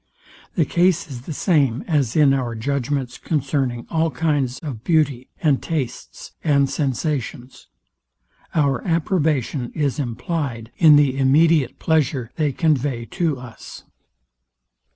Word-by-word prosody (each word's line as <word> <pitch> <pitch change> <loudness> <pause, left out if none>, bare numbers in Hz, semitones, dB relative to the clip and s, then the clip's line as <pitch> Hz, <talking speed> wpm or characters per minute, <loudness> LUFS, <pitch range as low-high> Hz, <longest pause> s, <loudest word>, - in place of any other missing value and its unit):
The 165 - +2
case 175 +3 +2
is 125 -2 -7
the - - -4
same 140 - +1
as 145 -9 0
in 145 -3 +5
our 125 -4 -2
judgments 135 +1 -2
concerning 135 -5 -1
all 165 0 +1
kinds 140 -3 -1
of 130 -8 -7
beauty, 145 -6 +1
and 145 -4 +3
tastes, 145 -7 -5
and 140 -3 +3
sensations. 135 -2 -3 0.9
Our 140 -5 +1
approbation 155 - 0
is 145 -2 -1
implyed 125 -2 -3
in 155 -4 +8
the 145 -3 +4
immediate 145 +1 +3
pleasure 140 -6 0
they 150 -3 0
convey 135 -5 0
to 165 -6 0
us. 125 -2 -11
140 Hz, 120 wpm, -21 LUFS, 125-155 Hz, 0.9 s, in